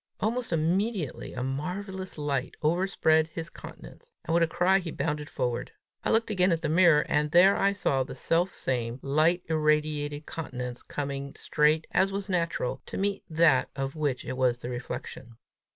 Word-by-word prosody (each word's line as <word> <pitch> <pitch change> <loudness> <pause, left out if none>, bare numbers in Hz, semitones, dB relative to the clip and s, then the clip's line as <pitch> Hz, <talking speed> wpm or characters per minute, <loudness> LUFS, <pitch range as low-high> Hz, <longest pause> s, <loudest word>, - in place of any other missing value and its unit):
Almost 235 +2 -1
immediately 175 - -1
a 125 - -3
marvellous 185 +8 -4
light 140 -3 -2
overspread 160 -1 +2
his 165 +1 -7
countenance, 470 0 -12
and 165 - -1
with 170 - +4
a 165 - +4
cry 180 +4 +3
he 175 -3 -5
bounded 150 0 -3
forward. 125 0 -2 0.3
I - - 0
looked 225 0 +2
again 185 -2 +3
at 165 0 0
the 155 - 0
mirror, 165 -2 +5
and 150 0 +1
there 180 +5 +6
I 200 0 +2
saw 140 -9 0
the - - -8
self 175 +3 +1
same 120 -2 -2
light 155 +6 +2
irradiated 150 -1 0
countenance 125 -6 -5
coming 140 -1 -5
straight, 155 +1 +2
as 190 +2 +2
was 200 0 -4
natural, 170 -8 -1
to - - -6
meet 200 0 -1
that 160 -4 +4
of 135 +1 -3
which 145 -5 -1
it 130 - -4
was 125 -2 +2
the 120 0 -7
reflection. 120 -1 -7
155 Hz, 170 wpm, -28 LUFS, 140-180 Hz, 0.3 s, there